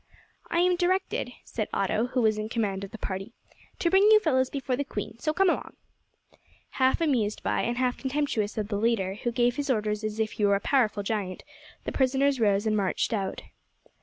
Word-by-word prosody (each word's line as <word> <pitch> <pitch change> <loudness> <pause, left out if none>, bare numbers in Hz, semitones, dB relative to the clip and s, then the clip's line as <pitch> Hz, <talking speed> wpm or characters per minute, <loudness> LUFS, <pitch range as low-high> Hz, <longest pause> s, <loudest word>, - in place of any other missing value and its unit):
"I 340 - +2
am 360 0 +3
directed," 365 -7 0
said 215 -2 -4
Otto, 215 +4 0
who 250 -1 0
was 215 -1 +2
in 215 +1 -4
command 205 -4 -1
of 200 - -6
the 225 - -9
party, 195 +2 -5 0.4
"to 340 - 0
bring 385 +1 +6
you 435 0 +8
fellows 260 -8 +1
before 270 -2 -2
the 285 - -1
queen, 220 -3 -6
so, 310 - 0
come 385 +5 +2
along." 345 - -1 1.0
Half 260 +4 +2
amused 240 -10 0
by - - 0
and 240 +1 -1
half 250 -1 0
contemptuous 265 -7 -1
of 210 -1 -2
the 205 - -1
leader, 210 -4 +1
who 240 - 0
gave 240 0 +1
his 285 -1 -2
orders 210 -3 0
as 215 0 -3
if 220 -1 0
he 210 - -3
were 200 0 +4
a - - 0
powerful 215 -4 +1
giant, 195 -3 -3 0.4
the - - -3
prisoners 270 +1 +2
rose 205 -1 +2
and 215 -1 +2
marched 200 +2 0
out. 195 -3 -3
230 Hz, 205 wpm, -27 LUFS, 210-275 Hz, 1.0 s, you